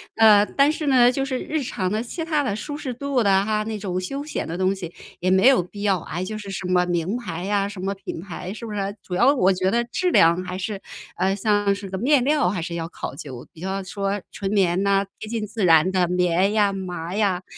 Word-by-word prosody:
呃， 215 -2 +7
但 275 +7 +2
是 310 -1 -4
呢， 250 -2 +6
就 270 +1 -1
是 265 -2 -2
日 310 -1 -2
常 185 -7 -2
的、 215 +1 0
其 320 +8 -5
他 310 -3 +1
的、 215 -8 -1
舒 255 +8 -5
适 280 -3 -4
度 270 +1 -1
的 195 -2 +3
哈， 215 0 0
那 220 -1 -3
种 185 -3 -3
休 275 +10 -4
闲 305 - -4
的 165 - -4
东 190 +1 +2
西 180 -4 -7 0.3
也 185 - 0
没 190 +3 +4
有 265 -8 +6
必 200 +4 -9
要， 195 -4 +2
哎， 175 +3 -5
就 215 +3 -5
是 200 -2 -8
什 195 - -5
么 180 0 +3
名 175 +4 -1
牌 180 -8 -5
呀， 200 0 0
什 205 -2 -9
么 195 +2 -2
品 195 -4 -7
牌， 180 0 -7
是 225 +3 -7
不 215 - -6
是？ 200 0 -3
主 180 - -8
要 240 +9 +5
我 190 -6 +3
觉 185 0 0
得 235 +4 +1
质 300 +10 -1
量 170 - +4
还 180 0 -5
是 195 +1 -4 0.4
呃， 190 +2 +1
像 205 0 +2
是 200 0 -7
个 190 0 -5
面 265 +1 +3
料 295 -7 +3
还 185 - -2
是 170 0 -5
要 165 -1 -4
考 - - -6
究， 135 -4 -8
比 165 - -14
较 190 +1 -3
说 195 +2 -2
纯 195 -1 -4
棉 190 -3 +2
呐， 200 0 +2
贴 215 - -7
近 225 -2 -2
自 210 0 -4
然 165 +1 +5
的 185 -2 +2
棉 180 +2 +2
呀、 205 -2 +3
麻 180 -2 -5
呀， 195 -4 +1
195 Hz, 270 characters per minute, -23 LUFS, 185-225 Hz, 0.4 s, 呃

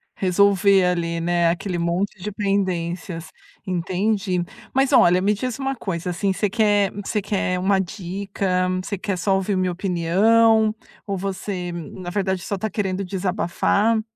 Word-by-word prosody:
Resolver 195 +1 +4
ali, 170 -2 0
né, 170 0 +2
aquele 175 +1 -2
monte 180 +3 -1
de 210 +2 -4
pendências, 185 -4 -2 0.4
entendi. 185 +1 0 0.3
Mas 270 0 +2
olha, 180 +1 +6
me 205 +2 +2
diz 250 +4 -3
uma 270 0 -2
coisa, 180 -5 -4
assim, 195 +3 0
você 210 +1 0
quer 205 -2 +2
você 205 +1 -2
quer 190 -2 -1
uma 190 +1 +2
dica? 185 0 -2 0.2
Você 200 0 -4
quer 195 -3 -2
só 195 +2 +1
ouvir 195 +1 0
minha 185 -1 +1
opinião 215 +5 +3 0.3
ou 195 -1 -2
você, 190 -1 -4
na 175 +2 -7
verdade, 190 -2 -1
só - - -4
está 220 +3 -3
querendo 195 -1 -2
desabafar? 200 +3 +1
190 Hz, 150 wpm, -22 LUFS, 180-205 Hz, 0.4 s, olha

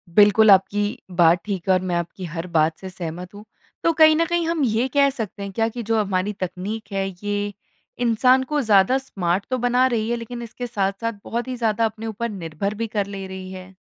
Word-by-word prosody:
बिल्कुल, 210 +1 +7
आपकी 205 +4 +3
बात 175 -1 +4
ठीक 195 -4 -4
है - - +6
और 185 - +2
मैं 180 -2 -2
आपकी 170 +2 -4
हर 165 +1 -5
बात 155 +1 +2
से 190 - -7
सहमत 180 +1 -7
हूँ। 210 +1 -11 0.4
तो 335 - +4
कहीं 315 0 +6
न 335 +2 +2
कहीं 345 0 0
हम 330 -3 0
ये 235 +1 +1
कह 280 -1 +5
सकते 215 -6 -5
हैं 200 - -5
क्या 225 +3 0
कि 240 0 -6
जो 225 +1 +1
हमारी 200 0 0
तकनीक 200 +4 -5
है, 195 -1 -1 0.2
ये 205 0 -2 0.5
इंसान 255 +3 +4
को 295 +2 -1
ज़्यादा 210 +3 +4
स्मार्ट 195 -7 -2
तो 255 - 0
बना 245 +1 +3
रही 230 -2 -1
है, 240 - +1
लेकिन 240 +1 -7
इसके 240 +1 -6
साथ-साथ 200 +2 -1
बहुत 235 +2 -3
ही 255 - -3
ज़्यादा 225 -1 +1
अपने 220 0 -4
ऊपर 230 +2 -3
निर्भर 190 0 -4
भी 225 +1 -3
कर 205 -2 -1
ले 195 -1 -6
रही 190 0 -8
है? 185 0 -10
210 Hz, 220 wpm, -22 LUFS, 190-235 Hz, 0.5 s, बिल्कुल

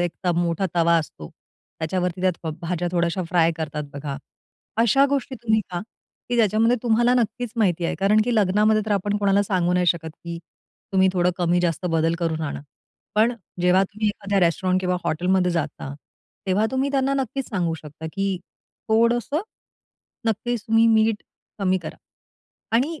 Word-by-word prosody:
एक 175 +2 -4
मोठा 175 +2 0
तवा 170 0 +4
असतो. 80 - -7 0.5
त्याच्यावरती 180 +2 -2
त्यात 185 0 +3
भ 160 - -2
भाज्या 175 +1 -1
थोड्याश्या 170 +1 0
फ्राय 165 -1 +3
करतात 155 -2 -4
बघा. 140 -1 -5 0.6
अशा 235 +5 +4
गोष्टी 275 -1 -1
तुम्ही 220 -1 +2
खा 175 -1 -3 0.5
की 240 - 0
ज्याच्यामध्ये 225 +2 +3
तुम्हाला 240 +1 +3
नक्कीच 240 0 -1
माहिती 180 -6 +1
आहे. - - 0
कारण 205 +3 +4
की 240 -1 0
लग्नामध्ये 215 +1 +3
तर - - -4
आपण 205 +1 0
कोणाला 200 0 +3
सांगू 180 -3 0
नाही 180 0 +2
शकत 160 -1 +1
की 170 0 -5 0.5
तुम्ही 190 0 +4
थोडं 180 -1 +2
कमी-जास्त 175 0 +1
बदल 165 +1 +2
करून 165 -2 -1
आणा. 145 - -4 0.5
पण 220 +3 +4 0.3
जेव्हा 180 +2 +4
तुम्ही 215 +2 -2
एखाद्या 200 -1 -1
रेस्टॉरंट 185 +2 +2
किंवा 180 -1 0
हॉटेलमध्ये 180 +3 +1
जाता 150 -4 -3 0.5
तेव्हा 190 +3 +2
तुम्ही 265 +1 0
त्यांना 275 0 +1
नक्कीच 270 0 -2
सांगू 175 -6 -1
शकता 155 0 -9
की 195 -1 -1 0.5
थोडं 235 +2 +4
असं, 285 +7 -2 0.9
नक्कीच 225 +1 -1
तुम्ही 225 +1 +4
मीठ 220 -1 +3 0.4
कमी 190 -1 +1
करा 155 - -7 0.8
आणि 300 +6 -1
190 Hz, 160 wpm, -23 LUFS, 170-220 Hz, 0.9 s, तवा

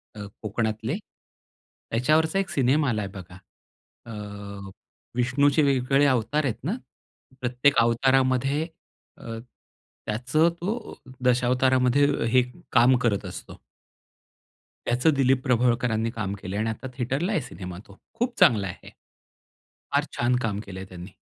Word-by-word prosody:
अ, - - -9 0.2
कोकणातले. 110 - -2 1.0
त्याच्यावरचा 155 +10 +2
1 195 - -2
सिनेमा 140 +2 +2
आलाय 105 -4 -1
बघा. 95 -1 -10 0.7
अ, 115 - -9 1.0
विष्णूचे 135 +4 +3
वेगवेगळे 135 0 +3
अवतार 130 +4 +1
आहेत 120 -3 -3
ना 175 - -1 0.7
प्रत्येक 125 +3 +2
अवतारामध्ये 130 +5 +2 0.5
अ, 115 -1 -6 0.7
त्याचं 130 +10 +2
तो 215 +5 -3 0.3
दशावतारामध्ये 125 +2 +3 0.3
हे 130 - +6 0.3
काम 125 +1 +5
करत 105 -4 +1
असतो. - - -9 1.3
त्याचं 125 +6 +2
दिलीप 135 -1 +3
प्रभावळकरांनी 120 -3 +1
काम 105 -4 -3
केलंय 95 +3 -4
आणि 110 +1 0
आता 110 +4 -5
थिएटरला 135 - -1
आहे 175 - +1
सिनेमा 90 -7 -8
तो 100 - -16 0.2
खूप 245 0 -2
चांगला 115 - +5
आहे. 90 - -9 1.0
फार - - +3
छान 120 +1 +2
काम 105 -4 -1
केलंय 95 -1 -7
त्यांनी. 90 0 -10
125 Hz, 120 wpm, -25 LUFS, 110-140 Hz, 1.3 s, हे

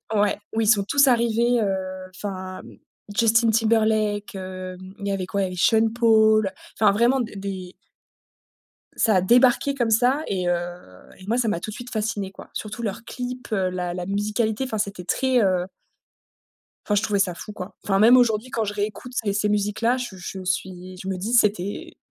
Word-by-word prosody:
Ouais. 205 -1 +2 0.2
Où 225 - +1
ils 220 - +1
sont 205 -2 +5
tous 280 +7 +4
arrivés, 235 0 +3
heu, 210 - +1 0.5
enfin 185 -2 -6 0.5
Justin 230 +1 +4
Timberlake. 215 -1 +1
Hem, 185 0 -8
il 200 - -5
y - - 0
avait 195 -2 -2
quoi? 200 +2 -2
il - - +2
y - - -2
avait 180 - -7
Sean 225 +4 +4
Paul, 220 -3 +4 0.3
enfin 210 -2 +5
vraiment 235 +6 +3
d 235 -2 -3
des 190 -2 -6 1.2
Ca 220 -3 +3
a 185 - +4
débarqué 250 +6 +4
comme 240 -4 0
ça 250 +7 +3
et 185 -2 -1
heu 175 - +3 0.7
et 185 - -12
moi 230 +3 +1
ça 245 -2 +1
m'a 210 -6 0
tout 215 - -6
de 215 - -7
suite 245 +1 -9
fascinée 210 -3 -2
quoi, - - -13
surtout 215 +2 -6
leur 225 0 -4
clip, 250 +1 -6
heu, 190 -3 +1
la 180 -1 -3
la 180 0 -4
musicalité, 210 +4 -1
enfin 255 -4 -3
c'était 200 -3 -3
très 260 +7 +1
heu 185 -2 +1 1.2
enfin 210 - +1
je 205 - +3
trouvais 210 -2 0
ça 190 -2 +1
fou, 210 - -9
quoi. 185 -1 -8
Enfin 195 -1 +1
même 235 +4 +7
aujourd'hui 235 -1 +2
quand 225 - -1
je 205 - -3
réécoute 210 +4 -4
ces 205 -5 -1
ces 210 +1 0
musiques 210 +1 -1
là, 240 +2 +3
je 245 -6 -5
je 185 +1 -7
suis, 185 0 -4
je 190 - -8
me 190 -1 -2
dis: 210 +6 -3
«C'était 205 -4 +1
210 Hz, 200 wpm, -23 LUFS, 190-230 Hz, 1.2 s, même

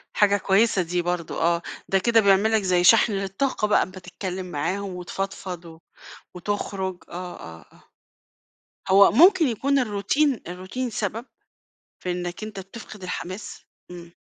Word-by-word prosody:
حاجة 205 -1 +4
كويسة 195 0 +2
دي 175 +1 -1
برضه 175 -2 -3
آه، 170 +1 +2 0.3
ده 195 - +3
كده 230 +4 +3
بيعمل 200 +2 +4
لك 220 -1 +3
زي 180 -2 +2
شحن 220 +3 +6
للطاقة 195 +4 -1
بقى، 210 - +2
بتتكلم 185 0 -6
معاهم 185 +6 -2
وتفضفض 180 -1 -5
و 160 -1 -12 0.6
وتخرج. 190 -1 -4
آه، 180 +1 -7
آه، 80 -2 -11
آه، - - -22 1.1
هو 195 +1 +7
ممكن 345 - +6
يكون 275 +4 +1
الروتين 245 +4 +1
الروتين 185 +8 -5
سبب؟ 220 +2 -3 0.8
في 180 - -1
إنك 175 +3 -4
أنت 210 -3 -7
بتفقد 195 +1 -11
الحماس؟ 185 +2 -6 0.3
إمم. 170 -1 -11
195 Hz, 140 wpm, -24 LUFS, 180-215 Hz, 1.1 s, هو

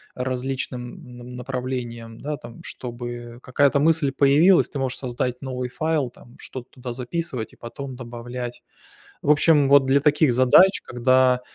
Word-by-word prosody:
различным 125 +1 -4
на 120 - -10
направлениям, 125 -2 -5
да, 150 0 -4
там. 120 -1 -12
Чтобы 120 -1 -7
какая-то 140 +2 +2
мысль 155 -2 +3
появилась, 145 +7 +5
ты 145 - -6
можешь 130 -1 -2
создать 125 -1 -3
новый 125 -2 -4
файл 155 -1 -1
там, 120 0 -18
что-то 130 -2 -9
туда 125 -1 -7
записывать 125 -1 -4
и - - -16
потом 130 +2 -8
добавлять. 120 0 -7 0.6
В 145 - -1
общем, 145 -1 +4
вот 140 -1 +6
для 135 +1 +3
таких 150 -2 +3
задач, 130 +10 +5
когда, 125 +1 +3
130 Hz, 145 wpm, -23 LUFS, 120-140 Hz, 0.6 s, вот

